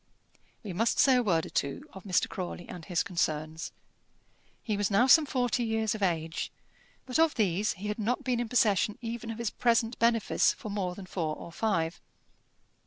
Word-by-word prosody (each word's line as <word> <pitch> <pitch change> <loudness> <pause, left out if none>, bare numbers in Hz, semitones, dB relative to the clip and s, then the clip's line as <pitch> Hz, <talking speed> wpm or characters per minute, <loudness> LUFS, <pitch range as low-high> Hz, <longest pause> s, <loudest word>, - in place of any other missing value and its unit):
We 200 -4 -5
must 225 +6 +1
say 265 -2 +6
a - - +3
word 170 -8 +1
or - - -9
two 140 - -2
of 190 0 -11
Mr. 185 -2 +2
Crawley 175 -1 -6
and 180 -3 -8
his 175 -4 0
concerns. 160 -3 -2 0.9
He 215 - -1
was 205 -1 0
now 210 +4 +4
some 300 +3 +6
forty 245 -2 0
years 220 -2 0
of 215 - -6
age, 165 -3 -1 0.5
but 255 +3 -1
of 325 -1 +4
these 205 -1 +1
he 200 +2 -7
had 210 +2 -3
not 245 +6 -1
been 250 -3 0
in 240 -2 -2
possession 210 -3 +2
even 230 0 -5
of 225 - -4
his 235 -2 -2
present 230 -1 +1
benefice 230 -1 +3
for 215 - -8
more 185 -3 -2
than 195 - -9
four 165 -4 -2
or 170 - -10
five. 170 -4 -1
210 Hz, 190 wpm, -29 LUFS, 180-235 Hz, 0.9 s, say